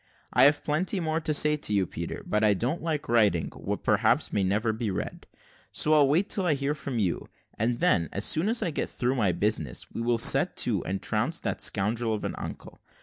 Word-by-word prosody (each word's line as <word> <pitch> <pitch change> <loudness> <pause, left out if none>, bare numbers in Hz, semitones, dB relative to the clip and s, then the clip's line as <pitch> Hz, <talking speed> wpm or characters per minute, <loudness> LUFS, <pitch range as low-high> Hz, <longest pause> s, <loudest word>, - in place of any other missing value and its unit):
I - - +6
have 145 +1 +3
plenty 175 +6 -1
more 160 -1 -1
to 155 - -2
say 150 0 +4
to 145 - -3
you, 100 -2 +2
Peter; - - -6
but 105 +1 0
I 105 -2 +4
don't 125 - -2
like 155 -3 -3
writing 105 -8 +2
what, - - -6
perhaps, - - +1
may 100 - +1
never 105 +4 0
be 110 -1 -3
read, 95 - -5 0.4
so 155 - +2
I'll 150 -2 +5
wait 165 +8 +2
till 195 - -1
I 155 - +2
hear 140 +1 -1
from 140 -4 -5
you; 95 -6 -1 0.3
and 120 +2 -1
then, 90 - +2
as 100 - -1
soon 165 +7 +1
as 230 0 0
I 175 - -1
get - - -3
through 125 +1 -1
my 105 -8 +1
business, 85 - -2
we - - -5
will 120 0 +1
set 115 - +5
to - - -1
and 95 +1 -4
trounce - - -1
that - - -3
scoundrel 110 +3 -1
of 105 - -7
an - - -3
uncle. - - -9
120 Hz, 225 wpm, -27 LUFS, 105-150 Hz, 0.4 s, I